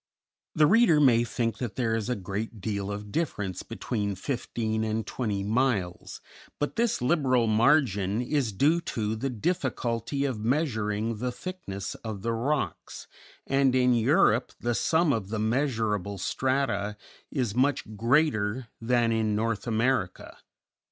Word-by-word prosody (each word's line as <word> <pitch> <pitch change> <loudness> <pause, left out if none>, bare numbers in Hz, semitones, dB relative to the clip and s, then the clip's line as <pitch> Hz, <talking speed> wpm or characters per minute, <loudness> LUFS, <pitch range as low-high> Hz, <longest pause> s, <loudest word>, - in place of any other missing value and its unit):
The 155 - +5
reader 190 -3 +5
may 120 -5 +5
think 115 0 -2
that 120 -4 -4
there 115 -3 0
is 115 +1 -2
a 125 - +1
great 105 +3 -5
deal 100 -1 -3
of 105 0 -6
difference 105 - -2
between 105 -3 -3
fifteen 110 -1 -2
and 110 0 -1
twenty 105 -4 -2
miles, 105 -5 -1 0.4
but 145 - -2
this 230 - 0
liberal 130 -5 +2
margin 110 -4 +3
is 125 -1 0
due 150 - +2
to 110 -9 -2
the 135 +5 -2
difficulty 130 - -1
of 130 -6 -2
measuring 115 -5 0
the 125 +3 -2
thickness 120 - -6
of 105 -4 -5
the 115 - 0
rocks, 120 - -2 0.4
and 135 -1 +2
in 125 -1 +4
Europe 120 - +3
the 120 0 0
sum 160 +5 +2
of 105 -5 -3
the 110 - -2
measurable 110 -4 0
strata 110 -2 -1 0.3
is 125 -8 -1
much 130 -3 0
greater 115 -1 +1
than 120 0 +2
in 110 -2 +1
North 115 +1 -1
America. 115 -4 0
115 Hz, 140 wpm, -27 LUFS, 105-135 Hz, 0.4 s, The